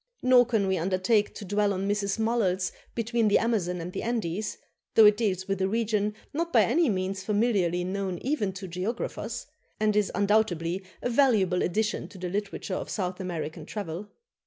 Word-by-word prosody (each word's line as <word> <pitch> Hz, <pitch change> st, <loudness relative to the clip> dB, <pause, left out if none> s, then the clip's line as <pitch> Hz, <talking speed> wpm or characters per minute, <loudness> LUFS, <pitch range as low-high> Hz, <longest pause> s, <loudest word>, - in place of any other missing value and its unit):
Nor 250 Hz, -1 st, +6 dB
can 220 Hz, -5 st, +1 dB
we 190 Hz, -2 st, +1 dB
undertake 190 Hz, +5 st, +1 dB
to 205 Hz, -, -7 dB
dwell 205 Hz, +1 st, +1 dB
on 190 Hz, +1 st, -2 dB
Mrs. 200 Hz, 0 st, 0 dB
Mulhall's 220 Hz, -5 st, +1 dB, 0.2 s
"Between 230 Hz, -1 st, +1 dB
the 205 Hz, -, +5 dB
Amazon 190 Hz, -6 st, 0 dB
and 175 Hz, +2 st, -6 dB
the -, -, -3 dB
Andes," 215 Hz, -3 st, -2 dB, 0.4 s
though 220 Hz, -, +8 dB
it 210 Hz, 0 st, +7 dB
deals 195 Hz, -4 st, -1 dB
with 195 Hz, -1 st, -1 dB
a 190 Hz, -, +2 dB
region 210 Hz, -1 st, 0 dB, 0.2 s
not 335 Hz, +3 st, -1 dB
by 225 Hz, -3 st, +6 dB
any 285 Hz, -, +2 dB
means 190 Hz, -1 st, -2 dB
familiarly 200 Hz, -5 st, +1 dB
known 190 Hz, 0 st, -2 dB
even 255 Hz, -8 st, 0 dB
to 190 Hz, +1 st, -7 dB
geographers, 190 Hz, -, -4 dB, 0.3 s
and 215 Hz, -1 st, +2 dB
is 210 Hz, -2 st, +2 dB
undoubtedly 195 Hz, -4 st, +1 dB, 0.2 s
a -, -, 0 dB
valuable 220 Hz, -9 st, +3 dB
addition 210 Hz, +4 st, 0 dB
to -, -, -13 dB
the 180 Hz, -1 st, -4 dB
literature 200 Hz, 0 st, -3 dB
of -, -, -3 dB
South 185 Hz, -2 st, -3 dB
American 165 Hz, -3 st, -4 dB
travel. 195 Hz, +2 st, -6 dB
200 Hz, 180 wpm, -27 LUFS, 185-220 Hz, 0.4 s, though